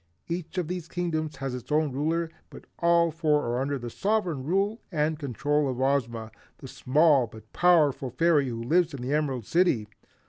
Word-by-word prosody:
Each 170 +1 -5
of 180 -4 -1
these 180 -1 -5
Kingdoms 160 -3 -2
has 135 -1 -4
its 125 +1 -7
own 150 -1 +2
ruler, 160 +5 -1 0.2
but - - -12
all 170 -1 +3
four 150 -2 +1
are 120 +2 -1
under 140 +1 -1
the 120 -2 -7
sovereign 190 - -1
rule 195 - 0
and 155 -1 0
control 145 +1 0
of 130 -1 -4
Ozma, 120 -5 0 0.3
the 135 - -10
small 140 0 +3
but 110 0 -15
powerful 155 -7 +3
fairy 145 +1 +2
who 115 -1 -5
lives 165 +4 +2
in 125 - -7
the 130 +3 -2
Emerald 135 -7 -1
City. 165 - +2
150 Hz, 180 wpm, -27 LUFS, 130-170 Hz, 0.3 s, all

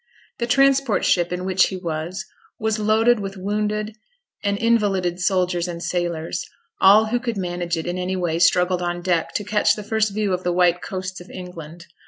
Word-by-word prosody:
The 235 - -1
transport 275 -1 +3
ship 175 -1 +2
in 180 +1 -3
which 190 0 +3
he 190 - -5
was, 175 +3 -4 0.3
was 220 0 0
loaded 220 +2 +3
with 195 -1 -5
wounded 210 +2 -2 0.5
and 200 -1 0
invalided 200 -6 +1
soldiers 180 -1 +1
and 170 -1 -6
sailors; 175 -2 -2 0.4
all 210 +3 +7
who 235 +3 0
could 235 -3 -3
manage 175 -2 -2
it 160 - -4
in 175 +1 -3
any 185 +1 -2
way 170 -3 -1
struggled 180 +1 +3
on 175 0 -3
deck 175 -3 0
to 210 - -1
catch 210 +1 +2
the 210 - -7
first 220 0 0
view 205 -1 -1
of 180 - -1
the 180 - 0
white 175 0 +3
coasts 185 -1 -5
of 175 - -13
England. 170 -2 -9
185 Hz, 190 wpm, -22 LUFS, 175-210 Hz, 0.5 s, all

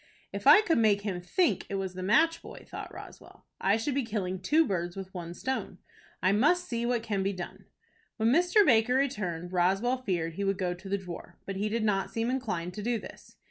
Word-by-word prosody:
"If - - -3
I 420 - +9
could 330 - +2
make 210 -3 +3
him 195 -4 -3
think 345 - +1
it 200 - -3
was 190 -1 -3
the 185 - -6
match 320 - +3
boy," - - -11
thought - - -7
Roswell, - - -12
"I 200 +3 +3
should 245 +5 -2
be 275 - +1
killing 195 -5 -3
two 320 +8 +3
birds 175 - -2
with 190 -1 -8
one 175 -2 -6
stone. 265 +8 -3 0.5
I 185 - +4
must 310 - +3
see 235 0 -2
what 240 -2 0
can 205 -4 -1
be 195 +1 0
done." 180 -2 -8 0.5
When 225 0 +2
Mr. 355 - +4
Baker 240 -1 +4
returned, 185 -10 -1
Roswell 195 +8 +2
feared 175 -9 -2
he 200 - -3
would 195 -1 0
go 180 -2 -1
to 185 +2 -11
the 200 - +1
drawer, 175 -2 -9
but 195 - -5
he 210 +2 -1
did 225 +1 -1
not 195 -3 +1
seem 230 +2 -1
inclined 180 -10 -3
to 210 - -6
do 235 +2 0
this. - - -12
205 Hz, 220 wpm, -29 LUFS, 185-245 Hz, 0.5 s, I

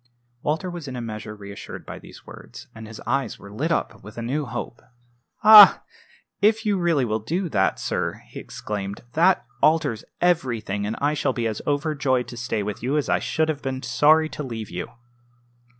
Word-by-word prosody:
Walter 155 +5 -1
was 175 -4 -6
in 130 - -6
a - - -4
measure 110 -2 -6
reassured 100 -1 -9
by - - -8
these - - -15
words, - - -12
and 110 -1 -10
his 110 0 -10
eyes 135 -1 -1
were 100 - -13
lit 155 +10 -2
up - - -2
with 105 - -12
a 115 - -4
new 140 +4 -2
hope. 120 0 -6 0.6
"Ah! 210 -2 +10 0.6
if 220 +2 +3
you 205 -3 +1
really 165 -7 +2
will 110 -1 -1
do 170 - -2
that, 95 -8 +1
sir!" - - -3
he - - -8
exclaimed. 100 -1 -6
"That 175 -2 +3 0.2
alters 155 -7 +2 0.2
everything; 120 - 0
and 110 - -3
I 145 +1 +1
shall 140 -3 0
be 120 -2 -2
as 110 -2 -2
overjoyed 145 -4 0
to - - -8
stay 115 -3 -2
with 105 0 -5
you 135 +6 0
as 150 - -1
I - - +2
should 160 0 0
have 150 -2 -2
been 130 0 -4
sorry 155 +2 +4
to - - -7
leave 115 -6 -6
you." 90 0 -4
130 Hz, 195 wpm, -23 LUFS, 110-155 Hz, 0.6 s, Ah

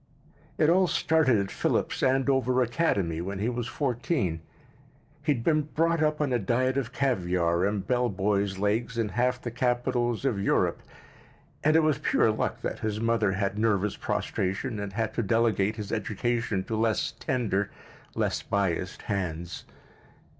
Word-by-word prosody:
It 155 - +4
all 185 +3 +4
started 160 -6 +3
at 100 -1 -2
Phillips - - -1
Andover 130 -1 +2
Academy 100 - 0
when 95 +3 -4
he 105 +5 0
was 120 -1 -3
fourteen. 125 - -1 0.8
He 150 +1 +1
had 115 - -5
been 155 +1 +3
brought 165 0 +2
up 150 0 +1
on 145 -4 0
a 120 - +2
diet 130 +6 +1
of 135 -4 -2
caviar 90 -9 +1
and 100 -1 -2
bell 125 0 +1
boys' 100 0 0
legs 110 +4 0
in 115 -2 0
half 125 +4 0
the 120 - -5
capitals 120 0 0
of 110 -7 0
Europe, 100 - +1 0.8
and 155 +1 +4
it 160 - +5
was 155 -5 +2
pure - - +3
luck - - -2
that - - -3
his 105 -1 -2
mother 115 -3 +1
had 100 +1 -1
nervous 105 -2 +1
prostration 100 +5 -2
and 100 -1 -5
had 110 0 -1
to - - 0
delegate 110 -1 +1
his 105 -2 -6
education 115 -1 -1
to 110 - -3
less 110 0 +1
tender, 105 -6 -1 0.5
less - - 0
biassed 95 -2 -1
hands. 85 -5 -3
115 Hz, 160 wpm, -27 LUFS, 100-130 Hz, 0.8 s, it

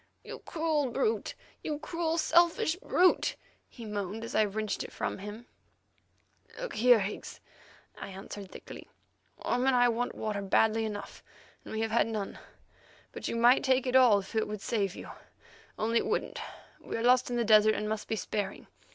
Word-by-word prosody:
"You - - -8
cruel 315 -4 -1
brute! 440 - -1 0.3
You 300 -2 -2
cruel 330 +1 -2
selfish 335 0 +3
brute!" 365 -1 +2 0.3
he 235 - -10
moaned 210 +1 -4
as 230 - -6
I 215 - +4
wrenched 215 +1 -3
it - - -9
from - - -3
him. 210 +4 -8 1.1
"Look - - -5
here, 240 -1 +5
Higgs," 195 +2 -5 0.6
I - - -6
answered 195 0 -8
thickly; - - -11 0.5
"Orme 250 +2 0
and 265 - +4
I 245 0 +5
want 240 +1 -2
water 210 -2 -3
badly 220 +3 +2
enough, 205 -2 -6 0.4
and - - -10
we 220 - -2
have 225 -1 -1
had 235 - +3
none. 215 -3 -4 0.7
But - - -6
you - - -2
might 240 +2 +5
take 260 -1 +2
it 250 0 -1
all 250 -5 +7
if 200 - -6
it 220 -1 0
would 210 -1 -5
save 200 -4 -1
you, - - -9 0.7
only 230 +2 +1
it - - -3
wouldn't. - - -2 0.4
We - - -5
are 225 - -3
lost 250 +1 +4
in 245 - -2
the 235 -1 +1
desert, 215 0 +6
and 210 - -2
must 215 0 -3
be 220 - -1
sparing. 205 -2 -4
225 Hz, 180 wpm, -30 LUFS, 210-255 Hz, 1.1 s, all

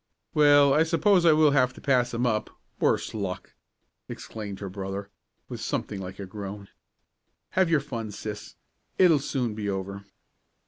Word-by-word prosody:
"Well, 145 -2 +6
I 150 - +4
suppose 170 +2 +3
I 160 - +7
will 155 -1 +5
have 130 -2 +3
to - - -11
pass 125 -3 +2
'em 120 +1 -1
up 110 -3 0 0.3
worse - - +1
luck!" - - -5 0.6
exclaimed 105 -3 -7
her 100 - -5
brother, 95 +1 -6 0.4
with - - -7
something 100 - -3
like 95 +1 -7
a 100 - -6
groan. 100 0 -8 0.8
"Have 185 -2 +2
your 155 -4 +3
fun, 115 -6 -5
sis. 105 0 -7 0.4
It'll 170 -5 +5
soon 130 -5 -2
be 105 -1 -3
over." 100 +1 -4
115 Hz, 155 wpm, -26 LUFS, 100-145 Hz, 0.8 s, I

